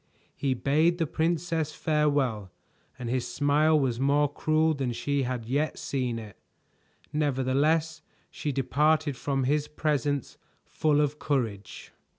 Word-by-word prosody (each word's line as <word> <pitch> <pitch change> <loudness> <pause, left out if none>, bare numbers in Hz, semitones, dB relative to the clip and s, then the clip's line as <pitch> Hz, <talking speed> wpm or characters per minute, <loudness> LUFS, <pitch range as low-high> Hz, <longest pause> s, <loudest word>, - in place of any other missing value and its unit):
He 135 -2 0
bade 155 +7 +2
the 165 - +1
princess 160 0 -1
farewell, 145 - 0 0.5
and 125 -2 -6
his 125 +1 -1
smile 150 +2 +3
was 125 -4 0
more 145 +2 +3
cruel 155 +1 +2
than 135 -4 -2
she 140 +4 -1
had 125 -3 -3
yet 145 +6 -1
seen 125 -4 -2
it. 110 -3 -10 0.7
Nevertheless 150 +3 +1 0.3
she 150 - -3
departed 150 +2 +1
from 135 +1 -1
his 145 +3 +1
presence 145 -3 -1 0.3
full 150 -1 +1
of 150 0 -1
courage. 115 -9 -3
145 Hz, 130 wpm, -27 LUFS, 130-155 Hz, 0.7 s, smile